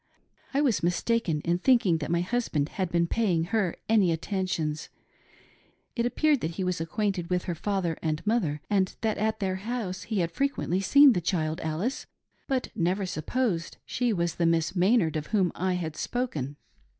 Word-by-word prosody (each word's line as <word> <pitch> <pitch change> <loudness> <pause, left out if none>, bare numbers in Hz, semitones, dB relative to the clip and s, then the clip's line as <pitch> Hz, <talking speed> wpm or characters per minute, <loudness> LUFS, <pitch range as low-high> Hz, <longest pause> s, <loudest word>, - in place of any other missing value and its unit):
I 280 - +1
was 255 -8 +2
mistaken 175 -1 0
in 175 +2 0
thinking 200 -8 +3
that 150 - -4
my 170 0 +2
husband 180 -8 -1
had 185 -3 -2
been 170 0 +2
paying 180 -4 +1
her 195 0 0
any 210 -6 +4
attentions. 165 -3 -2 1.1
It 235 -1 +1
appeared 295 +2 +2
that 160 +1 -3
he 190 - -1
was 180 -3 -1
acquainted 180 +1 -2
with 180 -1 0
her 175 - -2
father 180 -1 -1
and 155 +2 -2
mother, 175 -10 0
and 195 -3 +1
that 220 -2 0
at 220 +1 0
their 190 -1 -1
house 205 -3 -4
he 215 -5 0
had 170 0 -1
frequently 265 -7 0
seen 280 +6 +7
the 180 - -1
child 160 -2 -1
Alice, 160 - -2 0.4
but 260 -2 -1
never 185 +4 0
supposed 180 - -2
she 245 -1 0
was 170 -4 0
the 170 - +2
Miss 165 +2 +1
Maynard 180 -3 +3
of 150 -1 -3
whom 195 -5 +2
I 185 +1 -1
had 165 -4 -3
spoken. 155 - -3
185 Hz, 175 wpm, -27 LUFS, 165-220 Hz, 1.1 s, seen